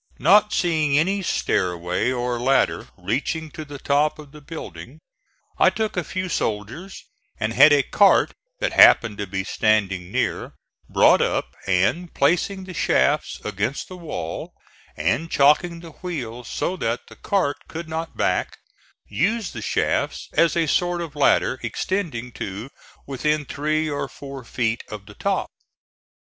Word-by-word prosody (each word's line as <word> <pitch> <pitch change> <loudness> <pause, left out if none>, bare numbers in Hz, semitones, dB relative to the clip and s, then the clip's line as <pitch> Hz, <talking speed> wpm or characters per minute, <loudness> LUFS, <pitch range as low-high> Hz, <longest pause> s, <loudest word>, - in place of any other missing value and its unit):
Not 210 +1 +5
seeing 155 -5 +2
any 195 +6 +1
stairway 90 - 0
or 125 -1 -2
ladder 135 +3 +1
reaching 145 - -2
to 155 - -7
the 145 -1 -9
top 145 +2 +1
of 150 -2 -12
the 150 0 -13
building, 155 +3 -9 0.6
I - - +6
took 220 -1 -2
a 180 - 0
few 185 +2 -4
soldiers, 120 - -4 0.3
and 110 0 -1
had 145 +5 +7
a 145 -2 +5
cart 200 +7 +4 0.3
that - - -1
happened 110 -3 +6
to 100 - -3
be 95 +1 -3
standing 95 -3 0
near - - -1 0.4
brought - - +5
up, - - -1
and, 100 - +1
placing 180 +6 +1
the 185 0 -9
shafts 150 -2 +1
against 105 +6 -2
the 185 - -8
wall 155 - -6 0.4
and 110 - 0
chocking 165 +5 +3
the 165 -1 -10
wheels 125 -10 -6
so 185 - -2
that 115 -4 -2
the - - -14
cart 185 -8 0
could 165 0 -7
not 160 +1 -5
back, - - 0 0.5
used 215 +4 -1
the - - -6
shafts - - -1
as 165 +1 +3
a 165 - +3
sort 175 +3 +1
of 160 -4 -6
ladder 135 -2 +3
extending 125 - -3
to 105 +4 -6 0.3
within 150 +2 -1
three 155 +2 -1
or 145 -2 -2
four 135 -2 -9
feet 120 0 -2
of 105 -2 -8
the - - -13
top. - - -2
145 Hz, 150 wpm, -23 LUFS, 115-170 Hz, 0.6 s, had